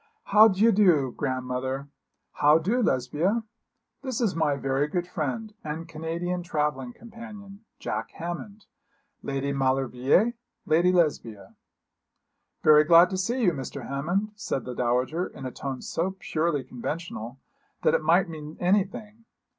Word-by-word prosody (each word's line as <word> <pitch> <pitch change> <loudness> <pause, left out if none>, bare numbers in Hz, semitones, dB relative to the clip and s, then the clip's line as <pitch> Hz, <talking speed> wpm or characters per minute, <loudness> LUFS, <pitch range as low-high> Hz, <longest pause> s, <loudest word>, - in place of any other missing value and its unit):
'How 215 +2 +7
d'ye 215 +3 +4
do, 175 - +4
grandmother? 130 +1 -3 0.4
how 150 +1 +4
do, 205 +10 0
Lesbia? 165 - +1 0.6
This 260 -4 -3
is 220 -9 +1
my 150 -3 +1
very 135 +1 0
good 175 +2 -2
friend 180 - -4
and 160 +2 -5
Canadian 165 +3 -3
travelling 150 -6 -2
companion, 210 - -12
Jack - - -4
Hammond 185 +5 -7 0.6
Lady 140 0 -2
Maulevrier, 135 - +2 0.3
Lady 175 +1 +3
Lesbia.' 145 - -1 1.1
'Very 150 0 +7
glad 170 +4 +6
to 190 - -2
see 240 +6 -1
you, 180 - +5
Mr. 135 -5 -6
Hammond,' 175 +10 -1
said 210 - -4
the 125 - -5
dowager, 125 +8 0
in 135 - -10
a 130 - -4
tone 135 -1 -5
so 185 +4 -2
purely 155 -5 -1
conventional 125 -2 -6 0.5
that - - +4
it - - +2
might 170 +5 +3
mean 155 -2 -8
anything. 210 +4 -1
165 Hz, 135 wpm, -26 LUFS, 135-195 Hz, 1.1 s, How